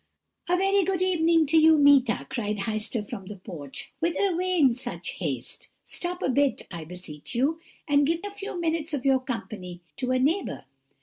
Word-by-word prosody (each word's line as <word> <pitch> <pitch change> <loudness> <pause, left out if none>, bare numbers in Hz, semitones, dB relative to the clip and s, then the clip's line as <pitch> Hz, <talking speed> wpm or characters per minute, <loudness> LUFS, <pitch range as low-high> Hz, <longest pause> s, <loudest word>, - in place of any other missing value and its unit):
"'A 360 - +3
very 390 +1 +3
good 370 0 0
evening 335 -3 +3
to 310 +3 +3
you, 315 0 +6
Meeta,' 280 -5 +5
cried 210 -3 -2
Heister 215 +1 -1
from 190 -1 -7
the 210 - -7
porch; 170 -8 -8
'whither 340 +4 +1
away 365 +1 0
in 270 -7 +5
such 250 - -4
haste? - - -5 0.2
Stop 360 +1 -4
a - - +1
bit, 275 -1 +2
I 170 -3 -6
beseech 175 - -8
you, 285 +7 +1 0.3
and 285 -1 +4
give 330 +1 0
a 410 - -5
few 400 -3 -6
minutes 320 -2 -1
of 270 - -5
your 270 -1 +4
company 215 -8 -6 0.2
to 255 -2 -2
a 255 - +3
neighbour. 300 - 0
280 Hz, 185 wpm, -26 LUFS, 215-335 Hz, 0.3 s, you